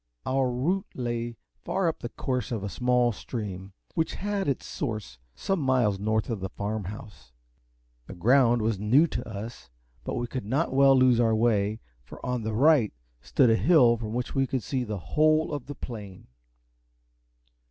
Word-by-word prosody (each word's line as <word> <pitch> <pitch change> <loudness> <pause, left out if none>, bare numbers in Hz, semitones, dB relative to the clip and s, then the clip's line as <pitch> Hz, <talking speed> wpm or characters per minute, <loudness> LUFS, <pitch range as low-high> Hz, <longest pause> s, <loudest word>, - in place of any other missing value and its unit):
Our 130 0 +1
route 170 +11 -1
lay 120 -1 -3 0.3
far 190 -2 0
up 165 - -1
the 120 - -5
course 125 0 -3
of 110 -4 -3
a 100 - -3
small 125 +1 +2
stream, 100 -4 -6 0.2
which 160 -1 -1
had 200 0 -2
its 140 - -1
source 110 - -5 0.2
some 195 -2 -1
miles 125 -8 +2
north 110 +1 0
of 110 - -2
the 95 0 -4
Farm 105 +1 -4
House. 95 - -10 0.7
The - - -8
ground 120 +3 +4
was 110 -3 0
new 120 +10 +4
to 160 - -5
us, 110 - -8 0.3
but - - -4
we 120 - -1
could 120 -3 -5
not 135 +6 0
well 135 0 +6
lose 130 -2 +5
our 115 -2 +3
way, 110 -1 +1 0.2
for - - -12
on 125 -1 -1
the 110 0 -3
right 140 -3 +4 0.3
stood 125 - +3
a - - +5
hill 125 -4 +5
from 110 -1 -5
which 125 0 -3
we 135 -1 +1
could 130 -4 -2
see 130 +5 -2
the 105 -3 -4
whole 155 - +2
of 140 -3 -5
the 145 - -6
plain. 105 -8 -8
120 Hz, 180 wpm, -27 LUFS, 110-135 Hz, 0.7 s, well